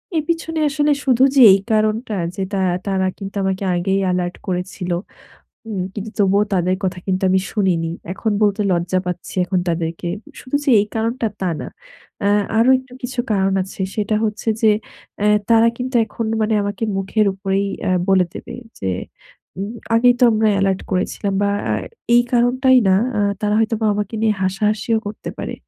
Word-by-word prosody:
এর 310 Hz, -, +1 dB
পিছনে 325 Hz, -1 st, -2 dB
আসলে 295 Hz, 0 st, +1 dB
শুধু 255 Hz, -1 st, +3 dB
যে 265 Hz, -, +6 dB
এই 195 Hz, -, +3 dB
কারণটা 215 Hz, +1 st, +1 dB, 0.2 s
যে 195 Hz, -, -2 dB
তা 195 Hz, -, 0 dB, 0.3 s
তারা 190 Hz, -1 st, +1 dB
কিন্তু 195 Hz, 0 st, -8 dB
আমাকে 190 Hz, +1 st, -1 dB
আগেই 190 Hz, +3 st, 0 dB
এলার্ট 180 Hz, 0 st, -1 dB
করেছিল, 180 Hz, 0 st, -3 dB, 0.7 s
হুম। 205 Hz, -5 st, -3 dB
কিন্তু 210 Hz, +1 st, -5 dB
তবুও 200 Hz, +1 st, +3 dB
তাদের 185 Hz, +1 st, +1 dB
কথা 185 Hz, 0 st, -2 dB
কিন্তু 190 Hz, 0 st, -1 dB
আমি 190 Hz, 0 st, +3 dB
শুনিনি। 175 Hz, -6 st, 0 dB, 0.2 s
এখন 220 Hz, +3 st, -2 dB
বলতে 205 Hz, 0 st, +2 dB
লজ্জা 175 Hz, +2 st, 0 dB
পাচ্ছি 180 Hz, -1 st, -5 dB
এখন 185 Hz, 0 st, 0 dB
তাদেরকে। 165 Hz, +1 st, -2 dB, 0.3 s
শুধু 260 Hz, +3 st, -2 dB
যে 275 Hz, -, +2 dB
এই 205 Hz, -, -1 dB
কারণটা 230 Hz, +1 st, -1 dB
তা 185 Hz, -2 st, 0 dB
না। -, -, -6 dB, 0.6 s
আ -, -, +4 dB, 0.3 s
আরো 235 Hz, +3 st, +4 dB
একটু 260 Hz, -1 st, -14 dB
কিছু 250 Hz, 0 st, -2 dB
কারণ 195 Hz, -1 st, +1 dB
আছে। 190 Hz, +1 st, -10 dB
সেটা 210 Hz, 0 st, 0 dB
হচ্ছে 215 Hz, +1 st, -3 dB
যে 220 Hz, -, +6 dB, 0.5 s
এ -, -, +3 dB, 0.2 s
তারা 230 Hz, 0 st, +6 dB
কিন্তু 255 Hz, +1 st, -5 dB
এখন 230 Hz, -, -4 dB
মানে 215 Hz, 0 st, +1 dB
আমাকে 205 Hz, +2 st, -4 dB
মুখের 195 Hz, +2 st, +1 dB
উপরেই 195 Hz, 0 st, -1 dB, 0.2 s
আ -, -, +1 dB, 0.2 s
বলে 190 Hz, -1 st, +4 dB
দেবে -, -, -8 dB, 0.2 s
যে, 95 Hz, -, -3 dB, 1.1 s
"আগেই 245 Hz, +1 st, +5 dB
তো -, -, +6 dB
আমরা 220 Hz, 0 st, +2 dB
এলার্ট 195 Hz, -1 st, +1 dB
করেছিলাম।" 195 Hz, +2 st, -1 dB
বা 200 Hz, -, +2 dB, 0.6 s
এই 240 Hz, -, +6 dB
কারণটাই 255 Hz, +2 st, +4 dB
না। 190 Hz, -, +5 dB, 0.2 s
আ -, -, +2 dB, 0.2 s
তারা 210 Hz, 0 st, +1 dB
হয়তোবা 225 Hz, -1 st, 0 dB
আমাকে 210 Hz, +2 st, -3 dB
নিয়ে 215 Hz, -1 st, +3 dB
হাসাহাসিও 210 Hz, +4 st, 0 dB
করতে 205 Hz, -, -6 dB
পারে। -, -, -4 dB
205 Hz, 170 wpm, -19 LUFS, 190-225 Hz, 1.1 s, যে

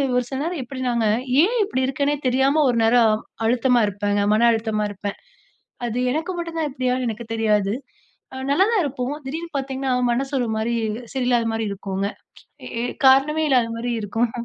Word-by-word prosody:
ஒரு 250 Hz, -, +2 dB
சில 265 Hz, -, -3 dB
நேரம் 335 Hz, -2 st, -3 dB
எப்டினாங்க, 245 Hz, -2 st, -1 dB, 0.4 s
ஏன் 440 Hz, +7 st, +1 dB
இப்படி 260 Hz, -10 st, -1 dB
இருக்கேன்னே 280 Hz, +2 st, 0 dB
தெரியாம 270 Hz, +4 st, +3 dB
ஒரு 240 Hz, -, +1 dB
நேரம் 225 Hz, -1 st, +5 dB, 0.3 s
அழுத்தமா 245 Hz, +1 st, +3 dB
இருப்பேங்க, 205 Hz, 0 st, 0 dB
மன 230 Hz, +2 st, +4 dB
அழுத்தமா 220 Hz, -2 st, -1 dB
இருப்பேன். 200 Hz, 0 st, -5 dB, 0.7 s
அது 235 Hz, +1 st, -3 dB
எனக்கு 320 Hz, +6 st, -2 dB
மட்டும் 335 Hz, -1 st, -4 dB
தான் 310 Hz, -, 0 dB
இப்டியான்னு 255 Hz, -1 st, -1 dB
எனக்கு 230 Hz, +1 st, -5 dB
தெரியாது. 210 Hz, -2 st, +1 dB, 0.8 s
நல்லாதான் 385 Hz, +7 st, +3 dB
இருப்போம். 265 Hz, -1 st, -3 dB
திடீருன்னு 320 Hz, +3 st, -5 dB
பார்த்தீங்கனா 265 Hz, -1 st, -2 dB, 0.2 s
மனசு 270 Hz, +3 st, -2 dB
ஒரு 240 Hz, -, -1 dB
மாரி 225 Hz, +2 st, -1 dB, 0.4 s
சரியில்லாத 245 Hz, -3 st, +1 dB
மாரி 225 Hz, 0 st, -1 dB
இருக்குங்க. 195 Hz, 0 st, -3 dB, 0.6 s
எ -, -, -8 dB
ஏ -, -, -1 dB, 0.2 s
காரணமே 300 Hz, +4 st, +4 dB
இல்லாத 245 Hz, -4 st, +3 dB
மாரி 240 Hz, +1 st, -2 dB
இருக்கும் 225 Hz, +3 st, -1 dB
250 Hz, 160 wpm, -22 LUFS, 225-275 Hz, 0.8 s, நேரம்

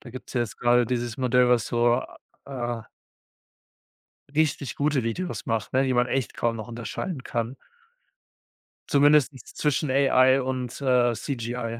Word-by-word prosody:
Da 120 Hz, -, -12 dB
gibt's 130 Hz, -, -10 dB
ja 120 Hz, -, +1 dB
jetzt 115 Hz, -, -7 dB
gerade 120 Hz, -1 st, +3 dB
dieses 120 Hz, 0 st, -2 dB
Modell, 125 Hz, -1 st, +3 dB
was 120 Hz, -2 st, +3 dB
so, 120 Hz, +1 st, +2 dB, 0.4 s
a 120 Hz, -3 st, -4 dB
äh -, -, -24 dB, 1.5 s
richtig 150 Hz, -3 st, 0 dB
gute 145 Hz, -2 st, +1 dB
Videos 175 Hz, +11 st, -4 dB
macht, 110 Hz, -2 st, -2 dB
ne, 130 Hz, +1 st, +3 dB
die 130 Hz, -, 0 dB
man 125 Hz, 0 st, +3 dB
echt 125 Hz, -3 st, -2 dB
kaum 115 Hz, -1 st, 0 dB
noch 110 Hz, +2 st, -7 dB
unterscheiden 120 Hz, -, -5 dB
kann, 120 Hz, +2 st, -3 dB, 1.3 s
zumindest 145 Hz, 0 st, +4 dB
nichts 130 Hz, -4 st, -13 dB
zwischen 150 Hz, -1 st, 0 dB
AI 130 Hz, -1 st, +4 dB
und, 125 Hz, -1 st, -4 dB
äh, 125 Hz, -2 st, +3 dB
CGI. 115 Hz, -2 st, -4 dB
125 Hz, 155 wpm, -25 LUFS, 120-135 Hz, 1.5 s, zumindest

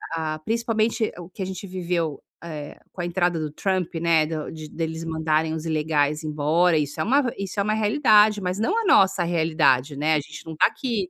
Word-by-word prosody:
ah, 155 Hz, -1 st, -3 dB
principalmente 225 Hz, 0 st, 0 dB
o 175 Hz, 0 st, -9 dB
que 190 Hz, -, -10 dB
a -, -, -1 dB
gente 190 Hz, +1 st, -6 dB
viveu, 175 Hz, -5 st, -2 dB, 0.2 s
eh, 150 Hz, -3 st, -7 dB
com 180 Hz, -, -6 dB
a 175 Hz, -, -2 dB
entrada 175 Hz, -1 st, 0 dB
do 155 Hz, -1 st, -3 dB
Trump, 185 Hz, +1 st, -2 dB
né, 165 Hz, -1 st, +3 dB
do 155 Hz, -1 st, -5 dB
de 155 Hz, -1 st, -8 dB
deles 160 Hz, 0 st, -4 dB
mandarem 160 Hz, 0 st, 0 dB
os 160 Hz, 0 st, -5 dB
ilegais 150 Hz, -1 st, 0 dB
embora, 155 Hz, +3 st, +2 dB
isso 145 Hz, -1 st, -2 dB
é -, -, +1 dB
uma 255 Hz, +1 st, +2 dB
isso 195 Hz, 0 st, -4 dB
é -, -, +3 dB
uma 215 Hz, +1 st, 0 dB
realidade, 215 Hz, -2 st, +4 dB
mas 180 Hz, +1 st, -2 dB
não 350 Hz, -, +1 dB
a -, -, -4 dB
nossa 190 Hz, -, +4 dB
realidade, 160 Hz, -5 st, +2 dB
né, 150 Hz, +3 st, +1 dB
a -, -, +2 dB
gente 145 Hz, -, -10 dB
não 160 Hz, -1 st, -7 dB
tá -, -, +5 dB
aqui 225 Hz, -9 st, -3 dB
170 Hz, 210 wpm, -24 LUFS, 155-195 Hz, 0.2 s, tá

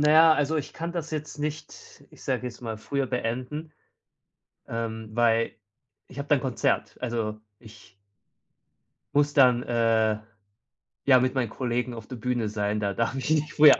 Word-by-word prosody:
na 150 Hz, +1 st, +5 dB
ja, 160 Hz, +1 st, +8 dB
also, 145 Hz, +2 st, +1 dB
ich 150 Hz, 0 st, -3 dB
kann 170 Hz, +1 st, -4 dB
das 165 Hz, -2 st, -4 dB
jetzt 150 Hz, -1 st, -4 dB
nicht, 150 Hz, +1 st, -6 dB
ich -, -, -15 dB
sage -, -, -1 dB
jetzt 120 Hz, 0 st, -7 dB
mal 115 Hz, -2 st, -4 dB
früher 140 Hz, +4 st, -1 dB
beenden, 125 Hz, +7 st, -3 dB, 1.0 s
ähm, 110 Hz, -1 st, -4 dB
weil 115 Hz, -1 st, +2 dB, 0.5 s
ich -, -, -14 dB
habe 140 Hz, -, -4 dB
da 145 Hz, -, +5 dB
'n 130 Hz, -, -1 dB
Konzert. 130 Hz, -3 st, 0 dB
Also, 115 Hz, -3 st, -2 dB, 0.2 s
ich 105 Hz, -4 st, -16 dB, 1.2 s
Muss 145 Hz, 0 st, +3 dB
dann, 125 Hz, -4 st, +6 dB
äh, 115 Hz, -2 st, +2 dB, 0.9 s
ja, 130 Hz, -2 st, +7 dB
mit 130 Hz, +1 st, +1 dB
meinen 125 Hz, -5 st, 0 dB
Kollegen 125 Hz, 0 st, -2 dB
auf 115 Hz, -2 st, -8 dB
der 125 Hz, -, -7 dB
Bühne 120 Hz, -2 st, -1 dB
sein. 105 Hz, 0 st, -1 dB
Da 100 Hz, -1 st, -1 dB
darf 115 Hz, +5 st, 0 dB
ich 135 Hz, +3 st, -2 dB
nicht 155 Hz, 0 st, +1 dB
früher 150 Hz, -1 st, +8 dB
125 Hz, 170 wpm, -27 LUFS, 115-145 Hz, 1.2 s, ja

